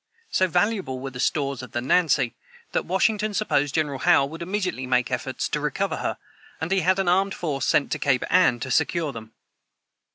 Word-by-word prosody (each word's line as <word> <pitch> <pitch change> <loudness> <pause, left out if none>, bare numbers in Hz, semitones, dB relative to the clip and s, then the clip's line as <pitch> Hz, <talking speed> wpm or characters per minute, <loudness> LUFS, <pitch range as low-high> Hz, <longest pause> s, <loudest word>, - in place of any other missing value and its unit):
So 185 - +3
valuable 185 - 0
were 135 +1 -6
the 125 - -9
stores 140 -1 0
of 125 -3 -11
the 120 - 0
Nancy, 135 -2 +2 0.4
that - - -1
Washington 210 +3 +1
supposed 145 -10 0
General 145 -4 0
Howe 170 -5 +4
would 160 +4 -8
immediately 180 -7 -2
make 125 -1 +1
efforts - - -2
to - - -1
recover - - -1
her, - - -3 0.4
and 160 +4 -4
he 195 - +3
had 185 +2 +2
an 195 -2 0
armed 190 +2 +2
force 145 -5 -2
sent 145 - +2
to - - -1
Cape 130 -3 +1
Anne 180 -9 +4
to - - -4
secure 165 -4 +1
them. 110 -2 -10
155 Hz, 195 wpm, -24 LUFS, 135-185 Hz, 0.4 s, Howe